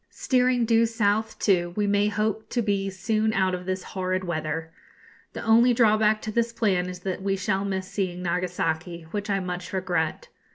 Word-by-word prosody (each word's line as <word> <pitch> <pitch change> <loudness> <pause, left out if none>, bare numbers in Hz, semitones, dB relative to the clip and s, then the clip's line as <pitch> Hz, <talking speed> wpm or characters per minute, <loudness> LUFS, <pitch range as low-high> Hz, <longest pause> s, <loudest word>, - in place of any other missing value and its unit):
Steering 250 -2 +1
due 230 0 +4
south, 220 -1 0
too, 175 -4 +1
we 210 - +1
may 205 0 +2
hope 215 +1 -1
to 240 - 0
be 200 -2 0
soon 215 +3 0
out 190 -2 +1
of 180 0 -5
this 185 0 -2
horrid 185 0 -2
weather. 160 -1 -3 0.6
The - - -6
only 235 +2 +5
drawback 215 -2 +3
to 215 - -3
this 235 +1 0
plan 190 -6 0
is 180 0 -8
that 190 0 -3
we 195 0 0
shall 195 0 0
miss 190 -1 -2
seeing 180 -2 -3
Nagasaki, 175 -1 -2
which 205 0 -4
I 195 -1 +1
much 180 -1 -5
regret. 180 -4 -2
195 Hz, 180 wpm, -25 LUFS, 180-215 Hz, 0.6 s, only